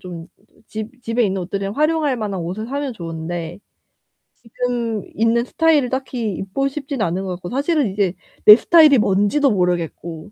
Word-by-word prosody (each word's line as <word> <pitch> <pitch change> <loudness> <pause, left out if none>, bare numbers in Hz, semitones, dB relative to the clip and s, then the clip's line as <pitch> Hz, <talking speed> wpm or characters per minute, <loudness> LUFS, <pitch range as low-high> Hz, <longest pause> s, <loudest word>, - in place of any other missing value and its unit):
좀 175 -2 -9 0.4
집 225 +3 -8
집에 230 +1 0
있는 190 -2 -1
옷들을 195 +4 -4
활용할 305 -3 +1
만한 200 -5 -4
옷을 185 +7 -5
사면 280 0 -3
좋은데 165 0 -6 0.8
지금 235 -2 -3
있는 230 +2 +2
스타일을 305 -4 +2
딱히 255 -5 -3
입고 200 +10 -2
싶진 275 -3 -5
않은 185 0 -1
것 190 - -5
같고 175 0 -8
사실은 285 0 0
이제 195 -3 0 0.3
내 210 - +12
스타일이 310 -2 +6
뭔지도 210 +7 +2
모르겠고 175 -1 -2
220 Hz, 330 characters per minute, -20 LUFS, 185-265 Hz, 0.8 s, 내